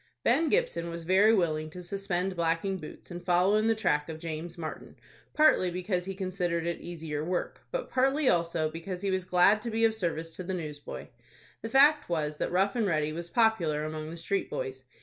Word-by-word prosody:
Ben 320 -1 +3
Gibson 435 - 0
was 170 0 -6
very 190 +5 +5
willing 155 -7 +1
to 180 +3 -9
suspend 190 0 -2
blacking 170 +3 0
boots 155 +3 -11
and 175 0 -7
follow 180 +3 +3
in 215 +1 +2
the 225 - +3
track 150 -8 0
of 160 - -5
James 165 +2 -6
Martin, 160 -2 -7 0.4
partly 305 -12 +5
because 180 0 -2
he 195 0 -5
considered 180 -3 -2
it 170 0 -2
easier 160 -3 -5
work, 180 +2 -3
but - - -4
partly 270 +3 +2
also, 170 -4 +2
because 180 +3 -6
he 195 - 0
was 185 -1 -1
glad 185 +4 +4
to 235 - -4
be 225 0 +2
of 225 - +3
service 165 -5 -3
to 185 - -5
the 185 +1 -3
newsboy. 150 -4 -6 0.6
The 225 - -5
fact 290 - +5
was 150 -3 -1
that - - -2
Rough 195 +4 +2
and 225 -4 +1
Ready 155 -3 0
was 170 +1 -5
popular 170 -9 +2
among 155 0 -5
the 170 - -7
street 195 +4 -1
boys. 130 0 -5
175 Hz, 205 wpm, -29 LUFS, 165-200 Hz, 0.6 s, very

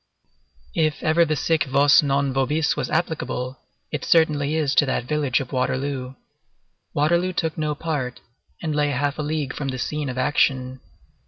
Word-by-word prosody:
If 155 -2 0
ever 165 +2 +4
the 155 -1 0
sic 160 +1 +1
vos 140 +2 +5
non 140 -1 0
vobis 150 +4 +1
was - - -3
applicable, 130 -6 -2 0.3
it - - -3
certainly 150 -3 +3
is 150 -4 +1
to 145 - +4
that 130 - 0
village 145 -2 +1
of 130 - -6
Waterloo. 130 0 -2 0.8
Waterloo 170 +5 +2
took 160 -2 -1
no 150 -1 -1
part, 145 -6 -3 0.4
and 155 -2 -1
lay 145 -1 +2
half 145 +2 -1
a - - +1
league 150 -2 -2
from 140 - -4
the 130 -1 -3
scene 150 +2 -3
of 125 - -5
action. 130 -1 +1
145 Hz, 165 wpm, -23 LUFS, 130-155 Hz, 0.8 s, vos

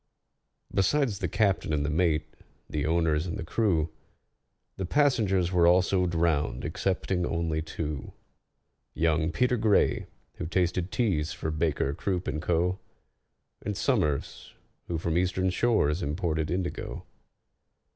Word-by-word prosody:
Besides 110 +1 +2
the - - -1
captain 100 -5 +1
and 75 -1 +1
the - - 0
mate, 80 -1 +1 0.3
the 75 0 -2
owners 80 0 +1
and 85 - -3
the - - -4
crew, 85 -5 +1 0.9
The 95 - -2
passengers 105 - +2
were 85 -2 +4
also 90 +1 +4
drowned 80 -6 0
excepting 90 +1 -1
only 80 -2 -1
two: 75 -3 -5 0.8
Young 80 0 +1
PETER 125 +8 +2
GRAY, 110 -2 +2 0.3
who - - -4
tasted 90 +1 0
teas 80 -10 0
for 80 -1 -3
BAKER, 75 -3 0
CROOP, 90 +3 -2
AND 75 0 -2
CO., 90 +3 +1 0.8
And 100 -1 -3
SOMERS, 90 - -1 0.3
who 85 - -2
from 85 +1 0
Eastern 95 +1 +1
shores 95 -7 +2
imported 80 -1 -1
indigo. 90 0 -3
85 Hz, 125 wpm, -28 LUFS, 80-95 Hz, 0.9 s, were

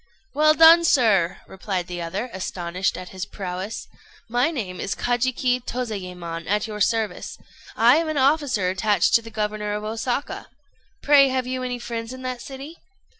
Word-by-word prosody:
"Well 305 +2 +4
done, 330 +2 +8
sir!" 210 - +3
replied 190 -2 -4
the 175 0 -6
other, 195 +9 -4
astonished 185 0 -2
at 185 -1 -8
his 185 -1 -6
prowess. 190 +2 -6 0.4
"My 245 +6 +1
name 205 - -5
is 195 - -2
Kajiki 250 0 0
Tozayémon, 180 -9 -5
at 210 +1 +1
your 210 -2 -6
service. 220 +1 -1 0.4
I 235 +5 +5
am 325 -1 0
an 310 - -2
officer 265 -9 +2
attached 205 +2 +1
to 230 - +6
the 225 - -10
governor 210 -1 -3
of 210 0 -4
Osaka. 230 +5 -3 0.6
Pray, 280 -1 +6
have 260 -1 -1
you 255 0 -3
any 250 -1 -3
friends 235 0 -5
in 260 0 -9
that 255 -1 -4
city?" 275 +5 -9
225 Hz, 165 wpm, -23 LUFS, 190-255 Hz, 0.6 s, done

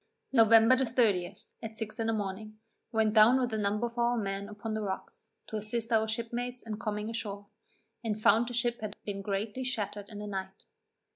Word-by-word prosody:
November 225 0 +7
the 260 - +1
30th, 220 -7 0
at 225 -1 -7
six 220 +1 -4
in 225 - 0
the - - +2
morning, 215 +1 -4 0.3
went 220 -2 +2
down 225 +4 +7
with 245 -3 -1
a - - 0
number 210 +3 0
of 235 0 -5
our 240 0 +2
men 200 -1 -3
upon 215 +1 -5
the 215 - -2
rocks, 190 -2 -6 0.2
to 220 - -4
assist 225 +2 -3
our 220 -1 +3
shipmates 240 +2 -3
in 215 -2 -5
coming 210 -1 -3
ashore, 205 -3 -4 0.6
and 215 -2 -2
found 225 +2 +4
the 245 - -5
ship 240 -1 0
had 215 -1 -5
been 200 -1 -4
greatly 205 +5 -2
shattered 210 -5 -3
in 210 - -9
the 210 - -5
night. 190 -1 -5
220 Hz, 200 wpm, -30 LUFS, 205-235 Hz, 0.6 s, November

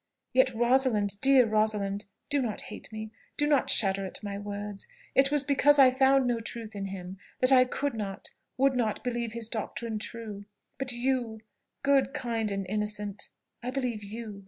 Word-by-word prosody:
Yet 260 -1 +3
Rosalind, 235 -4 +2
dear 270 -2 +6
Rosalind, 210 -2 0 0.3
do 285 -1 +3
not 225 -5 0
hate - - -9
me, 220 0 -6 0.3
do 295 - +2
not 295 -2 +2
shudder 195 -2 +4
at 190 - -6
my 200 -1 -4
words. 205 -1 -5 0.3
It 270 0 +4
was 295 -2 +2
because 290 +1 +4
I 265 -2 +7
found 265 0 +4
no 240 -2 0
truth 225 -1 -7
in 200 -1 -4
him, 190 -1 -7 0.2
that 255 +1 +4
I 255 -1 +7
could 285 +2 -2
not, 200 -4 -5 0.3
would 270 0 +3
not 220 -4 -1
believe 235 -2 -2
his 230 -1 -1
doctrine 225 0 -4
true. 210 -2 -7 0.3
But 270 -1 +2
you 240 -3 -1 0.4
good, 275 -1 +2
kind, 230 -3 -1
and 195 -1 -3
innocent, 210 0 -2 0.3
I 245 - -4
believe 250 -5 -3
you." 210 0 -7
230 Hz, 175 wpm, -28 LUFS, 205-260 Hz, 0.4 s, I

